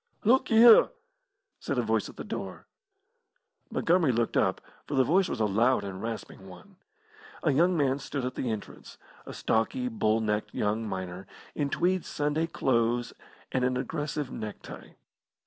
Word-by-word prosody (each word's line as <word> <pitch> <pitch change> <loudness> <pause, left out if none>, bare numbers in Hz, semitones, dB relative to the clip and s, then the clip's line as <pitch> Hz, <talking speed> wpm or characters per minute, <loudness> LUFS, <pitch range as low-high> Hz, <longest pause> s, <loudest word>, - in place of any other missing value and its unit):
"Look 255 +4 +3
y'ere!" 230 0 +8 0.7
said - - -3
a - - +1
voice - - 0
at - - -13
the - - -6
door. - - -6 1.0
Montgomery 165 -4 +2
looked 115 -1 -1
up, - - +2 0.3
for 145 - -3
the 135 - +5
voice 185 +8 +2
was - - -4
a 110 - +2
loud 115 +6 +2
and 95 -1 -6
rasping 110 -4 -6
one. 185 - -14 0.7
A 155 - +3
young 170 +6 +3
man 140 -2 +1
stood 140 -1 -4
at 125 - -3
the 125 - -3
entrance 110 -2 -7 0.3
a - - -7
stocky, 250 - 0
bull 115 - +1
necked 105 -1 -2
young 110 +2 -1
miner, 95 0 -6 0.3
in 145 -2 -1
tweed 185 +4 +1
Sunday 150 +2 -1
clothes 120 -5 0 0.4
and 130 - 0
an 125 0 +1
aggressive 145 +1 -3
neck 105 -2 -7
tie. - - -11
130 Hz, 165 wpm, -28 LUFS, 110-165 Hz, 1.0 s, y'ere